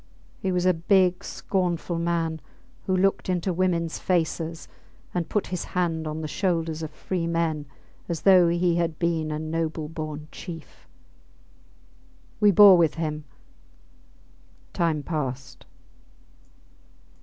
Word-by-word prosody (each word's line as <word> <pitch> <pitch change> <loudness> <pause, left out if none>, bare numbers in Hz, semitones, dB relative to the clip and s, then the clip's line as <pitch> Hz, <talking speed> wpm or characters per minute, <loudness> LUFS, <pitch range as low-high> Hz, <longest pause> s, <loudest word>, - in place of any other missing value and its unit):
He 190 - -1
was 180 0 0
a 185 - +5
big, 180 +2 +2
scornful 175 -2 -2
man, 165 -2 -1 0.5
who 185 - +2
looked 195 0 +1
into 180 0 0
womens 170 -2 0
faces 165 -2 -1 0.5
and 175 -2 -2
put 210 - 0
his 180 - -2
hand 165 -3 0
on 155 +1 -4
the 155 - -3
shoulders 165 -3 -1
of 160 - -4
free 170 +2 -3
men 165 -3 -1 0.4
as 170 -2 -2
though 185 -3 +6
he 170 0 +2
had 165 -2 -1
been 165 -2 0
a 150 - -2
noble 160 0 -3
born 155 -1 -6
chief. 165 -4 -10 1.5
We 210 -1 +6
bore 200 -1 +9
with 160 -3 +3
him. 155 -2 -3 1.5
Time 160 -4 0
passed. 135 -5 -5
170 Hz, 125 wpm, -25 LUFS, 160-180 Hz, 1.5 s, bore